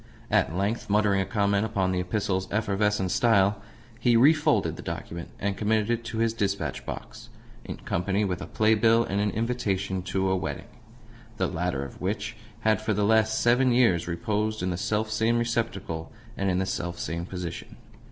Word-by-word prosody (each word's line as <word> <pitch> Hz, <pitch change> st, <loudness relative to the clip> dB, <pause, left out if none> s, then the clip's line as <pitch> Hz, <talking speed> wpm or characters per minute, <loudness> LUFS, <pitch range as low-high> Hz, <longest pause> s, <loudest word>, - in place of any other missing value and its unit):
At 100 Hz, -5 st, +2 dB
length, 105 Hz, +4 st, -1 dB
muttering 100 Hz, -1 st, +3 dB
a 95 Hz, -, -3 dB
comment 100 Hz, 0 st, +1 dB
upon 100 Hz, -4 st, 0 dB
the 90 Hz, -, 0 dB
epistle's 95 Hz, 0 st, -1 dB
efflorescent 105 Hz, -2 st, +1 dB
style, 100 Hz, -2 st, +3 dB, 0.4 s
he 120 Hz, -2 st, +4 dB
refolded 150 Hz, +4 st, +4 dB
the -, -, -8 dB
document, 85 Hz, 0 st, -6 dB
and 100 Hz, 0 st, -1 dB
committed 110 Hz, +1 st, +1 dB
it 120 Hz, 0 st, -1 dB
to 115 Hz, -, -5 dB
his 115 Hz, 0 st, +1 dB
dispatch 100 Hz, -, -2 dB
box -, -, -8 dB, 0.3 s
in -, -, -6 dB
company 100 Hz, +4 st, -1 dB
with 90 Hz, -1 st, -2 dB
a -, -, -6 dB
play 110 Hz, 0 st, +3 dB
bill 115 Hz, +1 st, +4 dB
and 100 Hz, -2 st, -1 dB
an 105 Hz, -, +1 dB
invitation 100 Hz, -5 st, -1 dB
to 95 Hz, +1 st, -1 dB
a -, -, +3 dB
wedding 80 Hz, -6 st, -4 dB, 0.7 s
the -, -, +1 dB
latter 85 Hz, -5 st, -2 dB
of 70 Hz, -, -11 dB
which 105 Hz, +5 st, -2 dB, 0.3 s
had 110 Hz, -1 st, +2 dB
for 110 Hz, -1 st, 0 dB
the 105 Hz, 0 st, +1 dB
last 110 Hz, 0 st, +3 dB
seven 125 Hz, +2 st, +4 dB
years 115 Hz, -9 st, +3 dB
reposed 105 Hz, +5 st, -1 dB
in 90 Hz, -, 0 dB
the -, -, -1 dB
self 110 Hz, +4 st, -1 dB
same 110 Hz, +2 st, +2 dB
receptacle 115 Hz, -9 st, -2 dB, 0.2 s
and 100 Hz, 0 st, 0 dB
in 90 Hz, -, +1 dB
the 95 Hz, -, +1 dB
self 85 Hz, -2 st, -3 dB
same 85 Hz, +2 st, -4 dB
position. 90 Hz, -3 st, -6 dB
100 Hz, 180 wpm, -27 LUFS, 95-110 Hz, 0.7 s, he